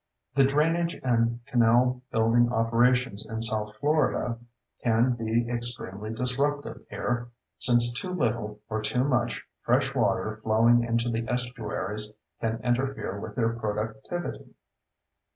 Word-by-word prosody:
The 135 -1 +5
drainage 165 +5 +1
and 120 -1 +1
canal 125 +1 +3
building 115 +2 +3
operations 120 -1 +2
in 110 0 -3
south 105 -1 0
Florida 145 -5 +1 0.4
can 115 +2 +3
be 115 0 0
extremely 115 -4 -2
disruptive 135 +5 -1
here, 120 0 -2 0.3
since 120 -1 +4
too 155 +9 -3
little, 115 -10 -1
or 110 -1 -2
too 125 +3 +1
much, 125 -4 0 0.2
fresh - - +1
water 110 0 0
flowing 115 +2 +4
into 115 0 0
the 115 0 -2
estuaries 110 -4 -3 0.3
can 115 0 -1
interfere 125 -5 -1
with 105 0 -7
their 115 -1 +1
productivity. 110 +8 -4
120 Hz, 120 wpm, -27 LUFS, 110-125 Hz, 0.4 s, The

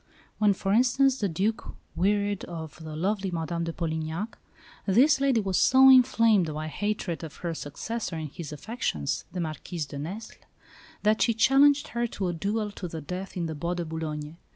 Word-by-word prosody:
When, 210 -2 +4
for 195 +1 -1
instance, 255 +3 +3
the 200 - 0
Duc 200 +7 -2 0.2
wearied 200 +2 +1
of 160 -1 -8
the 155 -1 -7
lovely 195 +4 -1
Madame 170 0 -2
de 165 - -2
Polignac, 160 +5 -3 0.5
this 270 +8 +5
lady 270 -4 +3
was 190 -3 0
so 265 +1 +7
inflamed 230 -8 +5
by 155 +1 -4
hatred 205 -2 -3
of 155 -3 -8
her 170 - -1
successor 175 +6 -5
in 155 -1 -4
his 150 +1 -8
affections, 150 - -3
the 185 - -5
Marquise 160 0 -4
de 140 0 -8
Nesle, 190 +10 -7 0.7
that 215 +1 +3
she 230 - +3
challenged 275 +5 +5
her 235 +1 -1
to 195 -4 -3
a - - -2
duel 205 +5 -2
to 195 -2 -6
the 165 -1 -6
death 180 +6 -6
in 170 - -1
the 160 - -3
Bois 170 +4 -2
de 175 -1 -3
Boulogne. 155 -1 -5
185 Hz, 180 wpm, -27 LUFS, 160-220 Hz, 0.7 s, so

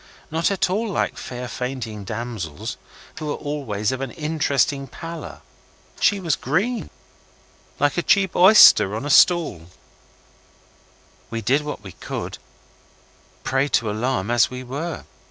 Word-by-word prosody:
Not 165 +2 +1
at 200 -2 +1
all 210 +5 -1
like 195 - -1
fair 125 0 -6
fainting 120 -5 -5
damsels, 105 -8 -5 0.4
who 155 -1 -4
are - - -1
always 130 -9 -3
of 130 0 -4
an 135 - -3
interesting 145 -2 0
pallor. 165 +3 -8 0.6
She 205 - +3
was 170 -6 0
green, 200 - -1 0.9
like 145 +4 +2
a - - +1
cheap 190 +1 +2
oyster 180 - +7
on 115 - -4
a 145 - -1
stall. 145 - +4 1.6
We 115 0 -4
did 135 +7 +2
what 150 -8 -6
we 95 - -9
could, - - -6
a - - -22
prey 135 +1 +1
to 115 -6 +1
alarm 115 -1 -1
as 120 -2 +4
we 130 0 -7
were. 145 +7 -5
135 Hz, 140 wpm, -22 LUFS, 120-165 Hz, 1.6 s, oyster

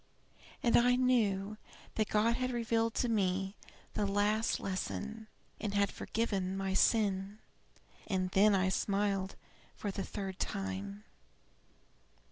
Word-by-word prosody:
And 235 - +4
I 245 +1 +5
knew 215 -5 +2 0.4
that 215 -1 0
God 220 +2 +3
had 255 0 -1
revealed 230 -2 0
to 245 - +1
me 195 -3 0 0.4
the 205 - 0
last 210 +3 +1
lesson, 215 +3 -4 0.3
and 205 -2 -3
had 200 0 +3
forgiven 195 -4 -2
my 195 0 -1
sin. 200 -1 +2 0.7
And 185 -2 0
then 200 +2 +5
I 190 0 +2
smiled 195 -1 0 0.4
for 205 - -3
the 195 - -4
third 195 -2 -5
time." 100 +1 -3
200 Hz, 120 wpm, -33 LUFS, 190-225 Hz, 0.7 s, I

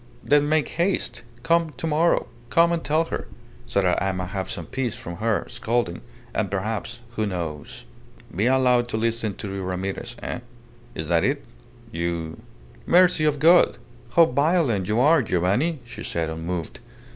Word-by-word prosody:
"Then 145 0 +3
make 155 -1 +2
haste. 185 +3 0 0.2
Come 165 -1 +2
to - - -4
morrow. 160 +2 +2 0.2
Come 170 +1 +4
and 170 -1 -1
tell 155 +2 +2
her, - - -5 0.4
so 100 - +1
that 90 -1 +2
I 95 - +1
may 90 0 -3
have 95 +1 -4
some 85 -3 -5
peace 125 +1 -3
from 85 0 -8
her 110 -1 0
scolding 115 -7 -1 0.3
and 105 -3 -1
perhaps 110 +4 -3
who 110 -2 -1
knows.. 85 -6 -5 0.2
." - - -20
"Be 105 +6 +2
allowed 125 -2 +3
to 115 - -2
listen 115 -2 -1
to 100 -3 -6
your 100 - -4
Ramirez, 95 +6 -4
eh? - - -3 0.6
Is 80 - -4
that 85 -1 +3
it? - - 0 0.5
You.. 85 -1 -3 0.3
." - - -23
"Mercy 175 -3 +5
of 150 -1 +2
God! 165 -1 +5 0.4
How 170 - +8
violent 140 - +1
you 110 +2 +1
are, 155 +5 +5
Giovanni," 100 - +1
she 120 - -9
said, 80 -1 -2
unmoved. 80 +1 -4
115 Hz, 170 wpm, -24 LUFS, 90-150 Hz, 0.6 s, How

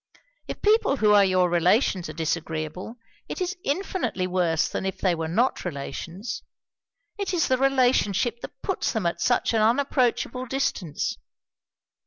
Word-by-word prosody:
If - - -7
people 420 -9 +3
who 215 -3 +3
are 205 -1 +7
your 185 -1 +3
relations 175 - +2
are - - -6
disagreeable, 160 +4 -3 0.3
it - - -5
is 365 +1 -2
infinitely 280 - -1
worse 180 -3 +1
than - - -4
if 190 0 -3
they 185 -3 +1
were 165 -1 -3
not 230 +11 +1
relations. 170 - -5 0.8
It 390 -2 -1
is 340 0 +2
the 255 -1 +1
relationship 245 -4 +2
that - - -10
puts 385 - -1
them 220 -6 -2
at 170 0 -1
such 245 +3 +2
an 220 - +2
unapproachable 250 +1 +1
distance. 220 - -2
210 Hz, 150 wpm, -25 LUFS, 175-260 Hz, 0.8 s, are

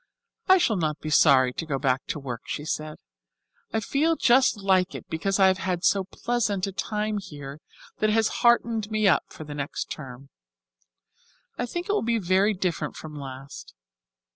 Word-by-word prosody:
"I 375 - +7
shall 230 - +2
not 155 -3 -1
be 155 - -5
sorry 130 -4 +5
to - - -4
go 140 -3 -1
back 135 -1 0
to - - -3
work," 125 -5 -6
she 150 - -4
said. 155 -1 -4 0.7
"I 220 - 0
feel 300 +9 +1
just 255 -4 +4
like 190 -2 +2
it - - -8
because 195 +5 -1
I 190 - +6
have 190 0 +3
had 180 -2 -2
so 195 -1 +3
pleasant 210 -2 -1
a 195 - -4
time 210 +2 -2
here 145 -5 -9 0.4
that 215 - +2
it - - +2
has 220 0 +3
heartened 230 -3 +3
me 215 -1 +1
up 185 - +3
for - - -10
next 145 -2 -5
term. 135 -2 -8 1.3
I 245 - -3
think 345 +8 -4
it - - 0
will 420 - +1
be 230 0 +1
very 195 +2 +2
different 175 -5 -2
from 155 -1 -9
last. 135 - -9
185 Hz, 185 wpm, -25 LUFS, 150-215 Hz, 1.3 s, I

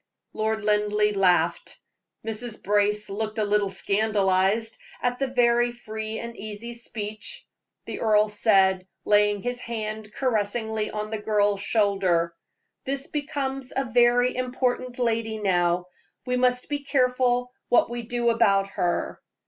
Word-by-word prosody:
Lord 220 0 -1
Linleigh 210 0 +2
laughed; 175 -3 +1 0.5
Mrs. 225 0 -3
Brace 210 +1 +2
looked 215 +2 -4
a 215 - +1
little 205 -1 +1
scandalized 200 +1 +1 0.2
at 245 0 -1
the 270 - 0
very 240 -1 +3
free 220 -2 -6
and 235 0 -6
easy 215 +3 -7
speech. 225 - -6 0.4
The - - -6
earl 215 -1 +3
said, 195 -3 +3 0.2
laying 205 -1 +3
his 245 0 -2
hand 215 -2 -5
caressingly 220 -2 -1
on 215 0 -5
the 220 - -2
girl's 205 -2 +1
shoulder: 195 -6 +1 0.5
"This 275 +1 -1
becomes 275 -3 -3
a 270 - 0
very 245 +1 +3
important 255 0 -2
lady 225 -2 -1
now; 180 -3 +1 0.4
we 250 -1 0
must 250 0 +2
be 290 -1 -2
careful 250 -3 +1 0.2
what 240 -1 +4
we 240 0 -3
do 235 0 0
about 200 -4 +3
her. 175 -2 -2
220 Hz, 130 wpm, -25 LUFS, 205-245 Hz, 0.5 s, what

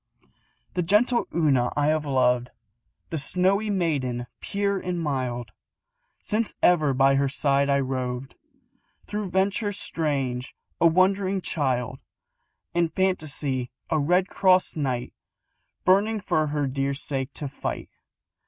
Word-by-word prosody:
The 180 - 0
gentle 215 +7 +2
Una 140 -7 +2
I 145 - +2
have 155 -1 0
loved, 125 -2 +2 0.6
The 160 - -1
snowy 190 +8 +1
maiden, 140 -11 -1
pure 200 -1 -1
and 180 -1 -3
mild, 125 -7 -2 0.7
Since 215 +1 -1
ever 155 -5 +4
by 135 +1 +4
her 140 0 +2
side 140 0 +1
I 140 0 +3
roved, 130 0 -3 0.7
Through 210 -2 -4
ventures 200 +2 0
strange, 135 -5 -2 0.2
a 170 - +6
wondering 190 +3 +2
child, 130 -7 -2 0.7
In 170 -1 +2
fantasy 150 -8 0 0.2
a 160 - +3
Red 180 +6 +2
Cross 185 -2 +3
Knight, 130 -5 -2 0.7
Burning 205 +4 +3
for 155 -5 0
her 145 -1 -1
dear 135 +1 -1
sake 135 -1 -3
to 145 - -4
fight. 140 - -5
150 Hz, 125 wpm, -25 LUFS, 135-185 Hz, 0.7 s, a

